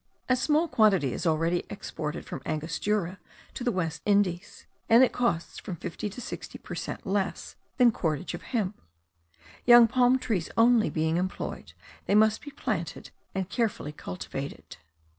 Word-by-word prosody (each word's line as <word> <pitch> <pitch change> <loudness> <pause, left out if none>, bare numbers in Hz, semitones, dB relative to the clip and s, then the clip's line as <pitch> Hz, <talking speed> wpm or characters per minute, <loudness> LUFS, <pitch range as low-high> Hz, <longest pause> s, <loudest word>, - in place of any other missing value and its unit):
A 255 - +4
small 305 +6 +2
quantity 195 - +3
is - - -2
already 165 +2 +1
exported 150 -2 -5
from - - -6
Angostura 170 +4 -2 0.3
to 250 - -5
the 245 - +1
West 165 -5 -2
Indies; 200 -3 0 0.2
and 230 +3 +8
it 255 - +3
costs 235 -9 -1
from 190 - -6
fifty 170 +5 -5
to 210 - -9
sixty - - -7
per - - -9
cent - - -5
less 195 -1 -2 0.2
than 245 -3 +6
cordage 165 -3 -2
of - - -6
hemp. 215 -5 -3 0.8
Young 240 -1 +8
palm 250 +2 +4
trees 210 -10 -2
only 230 -1 +5
being 160 +1 0
employed, 185 +1 -4 0.3
they 200 - +3
must 215 0 +4
be 290 - -8
planted 210 - -4 0.2
and 190 -1 -1
carefully 210 - -1
cultivated. 90 -11 -7
200 Hz, 155 wpm, -28 LUFS, 165-235 Hz, 0.8 s, and